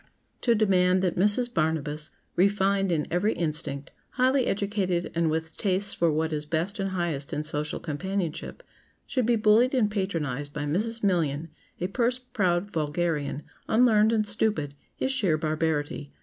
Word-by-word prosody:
To 235 -2 +3
demand 185 -3 +3
that 180 -3 +1
Mrs. 210 +6 +2
Barnabas, 155 -2 -1 0.3
refined 195 0 +2
in 155 -3 +1
every 185 +6 +2
instinct, 155 -4 -3 0.2
highly 260 0 +2
educated 195 -3 -1
and 165 -1 +1
with 160 0 -3
tastes 200 0 +2
for 170 -1 +2
what 160 +1 0
is 150 -1 -2
best 170 +7 -2
and 195 0 -1
highest 170 -7 -2
in 150 - -1
social 150 0 -2
companionship, 180 - -4 0.4
should 255 -5 -1
be 240 - +4
bullied 225 +4 +4
and 215 -5 +2
patronized 150 - -2
by 150 - -3
Mrs. 215 +10 -1
Million, 165 -5 +1 0.3
a 175 - -1
purse 240 +6 0
proud 200 -7 -1
vulgarian, 150 -2 -1 0.2
unlearned 220 -2 +4
and 220 -2 +2
stupid, 205 -8 0 0.3
is 265 - 0
sheer 195 -12 +1
barbarity. 155 -2 -2
180 Hz, 150 wpm, -27 LUFS, 155-210 Hz, 0.4 s, be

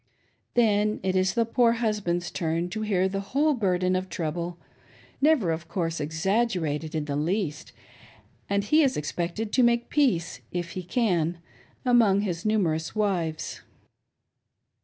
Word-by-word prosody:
Then 215 -2 +3
it 190 0 0
is 185 +2 +2
the 230 -1 +3
poor 230 0 +3
husband's 210 -7 -1
turn 165 +1 -1
to 215 +4 -4
hear 195 -3 +1
the 195 +1 -3
whole 280 +10 +1
burden 185 -6 +1
of 185 0 -2
trouble, 170 +1 -3 0.3
— - - -27
never, 280 - +4
of 165 +1 -4
course, 165 -2 -2
exaggerated 160 -1 -1
in 155 -2 -1
the 145 -1 -3
least, 155 0 -2 0.4
— - - -30
and 200 0 +1
he 305 +10 +4
is 275 -4 +2
expected 175 +8 -3
to 255 - +3
make 235 0 +2
peace, 175 - +1
if 175 -1 -3
he 185 - -4
can, 175 -4 0 0.5
among 225 -6 +4
his 180 -2 -2
numerous 170 -7 0
wives. 175 -7 -1
185 Hz, 150 wpm, -26 LUFS, 170-220 Hz, 0.5 s, never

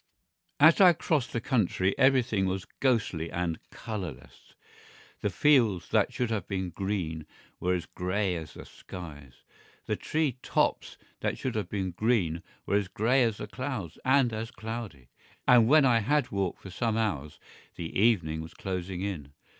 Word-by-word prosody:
As 160 +6 +7
I 180 -2 +9
crossed 150 -5 -1
the 115 - -1
country 100 -6 +1
everything 125 -7 +3
was 95 0 -2
ghostly 110 -11 +1
and 85 -2 -2
colourless. 95 - -8 0.6
The - - 0
fields 120 - +3
that - - +2
should 120 -2 -2
have 105 -5 -2
been 95 -3 -3
green 85 -5 -3 0.3
were 90 +1 +1
as 90 - -3
grey 90 +1 -1
as 80 -3 -7
the - - -9
skies; 75 -8 -11 0.4
the - - -1
tree 150 -5 -1
tops - - 0 0.2
that - - -1
should 130 - -3
have 110 -3 -3
been 95 -3 -2
green 90 -5 +1 0.2
were 100 - +2
as 100 -2 -1
grey 120 +7 +2
as 115 -4 +1
the - - -5
clouds 125 - -5
and 130 -3 +3
as 110 +1 -4
cloudy. 110 - -7 0.4
And 120 -3 +7
when 150 +2 +6
I 120 -3 +4
had 145 +6 +1
walked 95 -3 -2
for 95 - -8
some 110 +4 -1
hours 75 -10 -2 0.4
the 85 -1 -6
evening 90 -8 +2
was 80 0 -10
closing 95 -1 -4
in. 80 -9 -5
100 Hz, 160 wpm, -29 LUFS, 90-120 Hz, 0.6 s, I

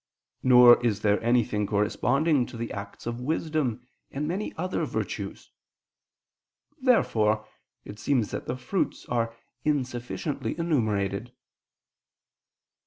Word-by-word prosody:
Nor 125 -1 +7
is 110 -4 +1
there 105 -1 +2
anything 115 -3 +1
corresponding 125 +7 +1
to - - -9
the 115 0 -4
acts 100 -1 -8
of 120 +1 -4
wisdom, 145 -4 -1 0.2
and 140 - -4
of - - -2
many 195 +5 -2
other 185 +3 -1
virtues. - - -4 1.3
Therefore 110 - +3 0.4
it 105 +1 -9
seems 120 -1 +1
that - - -5
the 125 - -2
fruits 130 +10 -2
are 115 -1 -1 0.3
insufficiently 135 +1 -2
enumerated. 110 - 0
120 Hz, 110 wpm, -27 LUFS, 110-145 Hz, 1.3 s, Nor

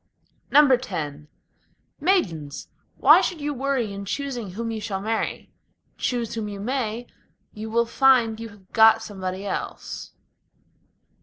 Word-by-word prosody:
X 260 -5 +5 1.1
Maidens! 170 - 0 0.3
why - - +7
should 350 - -2
you 295 0 -2
worry 265 -5 -1
in 200 0 -6
choosing 245 -2 -3
whom 230 +3 -3
you 220 -1 -4
shall 195 -2 -3
marry? 220 +3 -3 0.4
Choose 240 -3 -2
whom 220 -2 -3
you 200 -1 -6
may, 240 0 -2 0.5
you 215 +1 -6
will 235 +1 +2
find 235 -3 +3
you 230 0 -6
have 200 -3 -19
got 225 0 +6
somebody 190 -2 -5
else. - - -5
225 Hz, 130 wpm, -24 LUFS, 205-260 Hz, 1.1 s, why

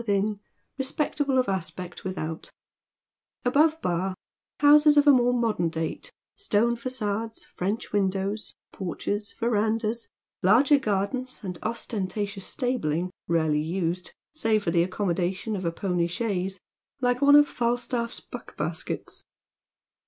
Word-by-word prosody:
within, 205 -1 0 0.4
respectable 280 0 0
of 255 - +3
aspect 185 -1 -4
without; 165 -4 -4 1.0
above 305 +5 +4
Bar, 180 +2 0 0.4
houses 295 0 +7
of 290 - +6
a 290 - +9
more 245 -2 +4
modern 225 -8 +1
date, 160 0 -4 0.3
stone 235 - +2
facades, 225 -3 -3
French 205 +7 -3
windows, 200 +1 -1 0.2
porches, 205 +3 -3
verandahs, 225 0 0 0.3
larger 250 +10 +5
gardens, 250 +3 -2
and 180 -3 -5
ostentatious 205 -3 -3
stabling, 180 - -1 0.2
rarely 160 -3 +2
used^ 175 +1 -2 0.2
save 220 -8 +1
for 170 - 0
the 170 - +3
accommodation 185 +2 -1
of 185 -2 -4
a 165 - +1
pony 175 -1 0
chaise, 190 -1 -2 0.4
like 245 0 +1
one 285 0 +7
of 295 0 +8
FalstafE'a 240 -2 -1
buck - - -9
baskets. - - -4
210 Hz, 120 wpm, -26 LUFS, 185-245 Hz, 1.0 s, a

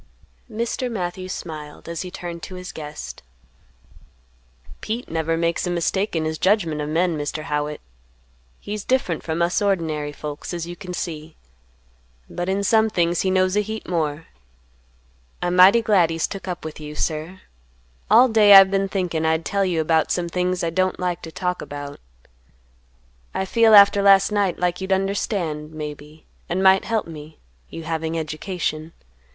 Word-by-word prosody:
Mr. 235 +3 -2
Matthews 185 -2 -4
smiled, 155 -5 -8
as 170 -1 -4
he 185 - -6
turned 175 -1 -7
to 185 - -8
his 180 0 -7
guest. 150 -1 -8 1.6
"Pete 230 +3 -4
never 165 0 -1
makes 170 +2 0
a - - -1
mistake 175 +3 -1
in 160 -1 0
his 155 0 -3
judgment 175 -7 +1
of 150 - -3
men, 170 +2 +1
Mr. 150 +1 -4
Howitt. 150 -1 -3 0.8
He's 210 0 -5
different 255 -11 0
from 165 +1 -1
us 175 +3 +1
ordinary 160 -7 -1
folks, 150 +3 -6
as 170 -1 -4
you 175 +1 -7
can 180 -1 -7
see; 160 -3 -6 0.9
but 175 +1 -4
in 195 +1 0
some 220 +2 +3
things 175 -3 +1
he 190 - 0
knows 185 0 +2
a 210 - +3
heap 220 +1 -6
more. 160 -2 -2 1.1
I'm 175 0 -1
mighty 195 +6 +7
glad 190 -7 +4
he's 165 -1 -1
took 195 -1 -7
up 175 -3 -5
with 155 -1 -7
you, 150 0 -8
sir. 160 +4 -3 0.7
All 235 +5 +7
day 215 -3 +7
I've 195 0 +9
been 195 0 +1
thinking 180 -5 -1
I'd 160 0 +1
tell 200 0 0
you 175 -3 0
about 160 0 +2
some 175 -1 -1
things 180 +1 -1
I 165 - 0
don't 185 +2 0
like 180 -2 -2
to 160 - -9
talk 180 +1 -3
about; 145 0 -7 1.4
I 190 - -1
feel 225 +2 +5
after 200 0 +7
last 195 0 +5
night 200 -3 +1
like 180 +1 -1
you'd 190 +1 -4
understand, 190 -5 -1
maybe, 150 0 -8 0.2
and 185 +3 0
might 190 0 +5
help 225 -1 -1
me, 155 -1 -11 0.3
you 165 - -8
having 160 0 -3
education. 160 0 -4
175 Hz, 170 wpm, -22 LUFS, 160-195 Hz, 1.6 s, I've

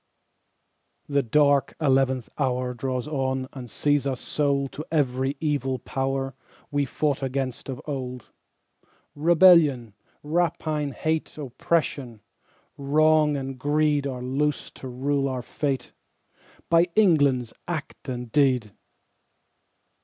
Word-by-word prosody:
6.) - - -7
The 140 - +4
dark 140 +3 +2
eleventh 135 -4 +2
hour 125 -1 0
Draws 130 +1 -3
on 130 -3 -1
and 125 -4 -8
sees 145 +3 +1
us 130 -2 -2
sold 140 -2 0
To 150 - -6
every 135 -2 0
evil 145 -4 -1
power 135 +2 -2 0.4
We 145 -1 +1
fought 145 +1 -1
against 135 -1 -3
of 130 -2 -4
old. 125 -4 -5 0.8
Rebellion, 155 - +5 0.3
rapine 155 -2 -1
hate 160 +2 -2
Oppression, 135 -4 -2 0.6
wrong 150 +1 +3
and 135 -1 -5
greed 145 0 +1
Are 125 -2 -5
loosed 140 +3 -1
to 130 - -8
rule 135 +2 -1
our 130 -2 -3
fate, 140 -2 -3 0.8
By 170 +1 +4
England's 145 - +3
act 155 -4 -5
and 125 -2 -5
deed. 130 -6 +2
140 Hz, 115 wpm, -25 LUFS, 130-150 Hz, 0.8 s, Rebellion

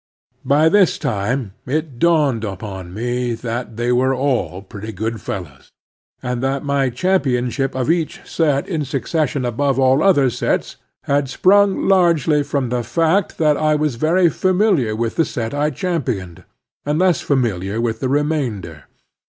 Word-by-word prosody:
By 150 +3 +4
this 190 +1 +4
time 120 -3 -2
it 145 -2 -3
dawned 150 -9 +2
upon 95 -3 -6
me 120 +3 -2
that 115 -1 -5
they 120 +1 0
were 130 +2 +2
all 125 -8 -1
pretty 105 +2 -8
good 110 +2 -4
fellows, 85 -8 -7 0.5
and 125 -1 -2
that 135 +1 -1
my 140 -2 +1
championship 135 -4 0
of 130 -2 -1
each 165 -2 -1
set 145 -4 0
in 160 -6 -2
succession 145 0 -1
above 135 +3 0
all 135 +2 +3
other 145 -10 +4
sets 120 - -2 0.3
ha,d 140 0 +1
sprung 200 +7 +3
largely 170 -6 +3
from 140 -3 -2
the 125 0 -1
fact 165 - 0
that 150 -2 +2
I 155 0 +2
was 150 -2 0
very 165 +9 +2
familiar 180 - +1
with 115 0 -3
the 165 - +4
set 115 -6 -4
I 145 +1 +1
championed, 130 - -3 0.4
and 150 +1 -1
less 180 0 +2
familiar 110 -7 -1
with 115 -1 -1
the 130 - -1
remainder. 130 - -2
135 Hz, 150 wpm, -19 LUFS, 115-155 Hz, 0.5 s, By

